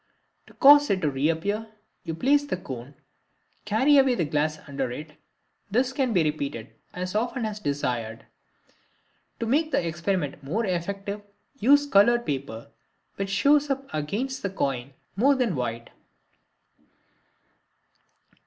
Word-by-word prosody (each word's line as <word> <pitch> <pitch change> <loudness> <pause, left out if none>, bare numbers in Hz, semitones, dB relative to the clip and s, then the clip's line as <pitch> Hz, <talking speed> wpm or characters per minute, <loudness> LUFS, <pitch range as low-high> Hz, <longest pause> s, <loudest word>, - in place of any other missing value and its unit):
To - - -18
cause 290 +1 +7
it 195 - +2
to 150 - +2
reappear 165 +10 -1 0.4
you 165 - -3
replace 285 - +2
the 235 - -3
cone 130 -8 -7
and 140 -2 -28
carry 260 +8 +4
away 265 -2 +4
the 170 - 0
glass 150 +1 0
under 135 -2 -3
it. 150 +5 -7 0.6
This 250 +5 +1
can 265 -3 0
be 180 -6 +3
repeated 140 -6 -3 0.2
as 180 0 -5
often 235 +2 -1
as 215 -1 -4
desired. 125 - -3 1.1
To 230 - -2
make 300 +7 +1
the 170 - +1
experiment 170 -3 -2
more 205 +12 -1
effective, 195 +3 -3 0.4
use 285 +5 +5
colored 240 -1 +4
paper, 130 -5 -5 0.5
which 195 0 -3
shows 285 +8 +3
up 275 0 -2
against 215 - -3
the 200 - -2
coin 135 -7 -3 0.2
more 270 +8 +4
than 245 -9 0
white. 115 -2 -4
195 Hz, 135 wpm, -26 LUFS, -, 1.1 s, cause